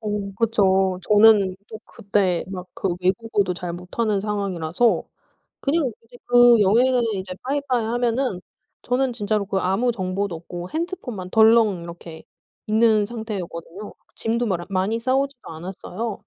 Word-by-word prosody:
어 205 -2 -3
그쵸. 190 -4 +2
저는 210 -3 +6
또 220 - -8
그때 195 -3 -1
막 185 -1 -6
그 195 - -2
외국어도 190 0 0
잘 175 0 -5
못하는 195 +4 -2
상황이라서 200 0 0 0.6
그냥 285 -2 +1
이제 245 +2 -16
그 245 -2 +6
여행을 240 +5 +4
이제 185 -1 -5
빠이빠이 260 -3 -1
하면은 240 -3 -1 0.4
저는 250 +1 0
진짜로 210 -2 -1
그 195 - -1
아무 195 +7 +1
정보도 190 -2 -2
없고 175 +2 -8
핸드폰만 310 - -5
덜렁 220 -5 +4
이렇게 170 -1 -10 0.4
있는 215 -1 +3
상태였거든요. 205 -4 -7 0.2
짐도 230 +1 -1
마라 175 -4 -2
많이 195 +4 0
싸 255 +2 0
오지도 275 -2 -3
않았어요. 185 +6 -6
210 Hz, 310 characters per minute, -22 LUFS, 185-235 Hz, 0.6 s, 저는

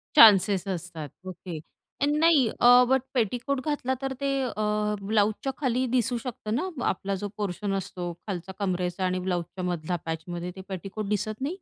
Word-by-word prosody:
Chances 200 - +7
असतात, 170 -5 -4 0.2
okay 175 -2 -6 0.4
आणि 295 +1 +2
नाही 320 -7 +5
अ, 245 +1 +8
बट 265 -1 +4
पेटीकोट 250 +3 0
घातला 285 -4 0
तर 270 0 -2
ते 280 - +1 0.2
अ, 210 -2 0
ब्लाउजच्या 215 +5 +1
खाली 255 -2 +1
दिसू 245 0 +2
शकतं 230 -2 -4
ना 310 - 0 0.2
अ - - -2
आपला 195 +1 -2
जो 205 - -2
पोर्शन 200 0 -2
असतो, 180 -2 -4 0.2
खालच्या 190 -1 -4
कमरेचा 180 0 -1
आणि 185 0 0
ब्लाउजच्या 180 0 -3
मधला 175 -1 -1
पॅचमध्ये 170 +2 -4
ते 190 - -8
पेटीकोट 195 +3 -5
दिसत 215 +3 -2
नाही? 295 +6 -1
205 Hz, 165 wpm, -27 LUFS, 180-245 Hz, 0.4 s, अ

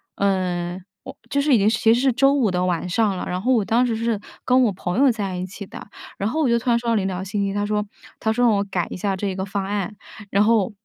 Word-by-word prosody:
嗯， 185 -2 -1 0.2
我 - - -9 0.2
就 280 - +2
是 290 0 +2
已 - - +6
经 200 -1 +2
其 225 0 +4
实 235 - +1
是 265 0 +2
周 275 +3 +4
五 260 -7 +2
的 180 0 0
晚 180 -1 -1
上 200 +1 +1
了。 - - -4
然 180 +1 -3
后 250 +6 +1
我 220 -5 +2
当 235 +4 +2
时 235 -2 -1
是 230 0 0 0.3
跟 255 0 +4
我 230 - +3
朋 180 +2 -3
友 275 -1 +5
在 200 -5 -3
一 180 0 -3
起 200 +2 -9
的， - - -10 0.3
然 200 - -1
后 310 - -2
我 295 - +2
就 235 -1 +3
突 245 - -3
然 235 - +4
收 235 - -7
到 230 - +2
了 210 - +2
一 - - -3
条 185 -1 -3
信 200 +1 -2
息， 195 - -1
他 205 0 -1
说 210 0 0 0.4
他 220 - 0
说 245 +2 +2
让 230 - +5
我 200 - +1
改 190 -3 -2
一 - - -4
下 195 +1 -1
这 195 -1 -2
个 190 - -3
方 195 0 -3
案， 205 +1 -3 0.3
然 200 +1 +3
后， 220 -1 +2
205 Hz, 315 characters per minute, -22 LUFS, 190-235 Hz, 0.4 s, 已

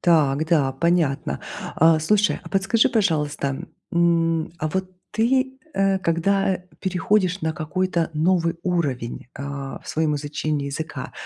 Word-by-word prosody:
Так 155 -4 +3
да, 145 -5 +2
понятно. 150 - +1 0.4
А 160 0 +5
слушай, 205 +6 +2
а - - -10
подскажи 195 +4 +3
пожалуйста, 155 - 0 0.3
м, 165 -2 +2
а 155 - -1
вот 185 +3 -2 0.2
ты, 260 +4 +1 0.2
э, 195 0 +2
когда, 190 +3 +1
э, 180 - -7 0.2
переходишь 190 0 +1
на 160 - 0
какой-то 170 +1 -1
новый 165 +1 +2
уровень, 140 -12 -2
а, 140 -1 -6
в - - -11
своём 155 -1 +1
изучении 145 0 -2
языка, 155 +3 -5
165 Hz, 135 wpm, -23 LUFS, 150-190 Hz, 0.4 s, А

